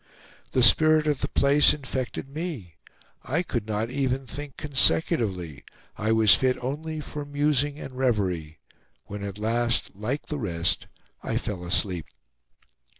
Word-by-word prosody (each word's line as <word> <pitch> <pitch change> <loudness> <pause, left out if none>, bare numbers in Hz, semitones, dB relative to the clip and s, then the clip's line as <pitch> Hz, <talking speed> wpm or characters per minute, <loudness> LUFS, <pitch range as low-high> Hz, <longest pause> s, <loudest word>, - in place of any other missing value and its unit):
The 130 - +3
spirit 155 +5 +6
of 150 -3 0
the - - 0
place 140 +1 +5
infected 130 -2 -4
me; 140 - -6 0.5
I 165 +7 -1
could 120 -10 -3
not 110 +2 -2
even 135 -1 -1
think 145 +1 -8
consecutively; 115 - +1 0.3
I 110 +1 -1
was 110 -2 +6
fit 130 -1 +2
only 155 +4 -4
for 150 0 -6
musing 145 0 0
and 140 - -8
reverie, 95 -12 -1 0.5
when 105 0 -7
at 100 0 -5
last, 115 +2 0
like 110 +9 -4
the 150 - -4
rest, 85 -6 -1 0.3
I - - -2
fell 95 -4 -4
asleep. 90 -2 0
125 Hz, 140 wpm, -26 LUFS, 105-145 Hz, 0.5 s, spirit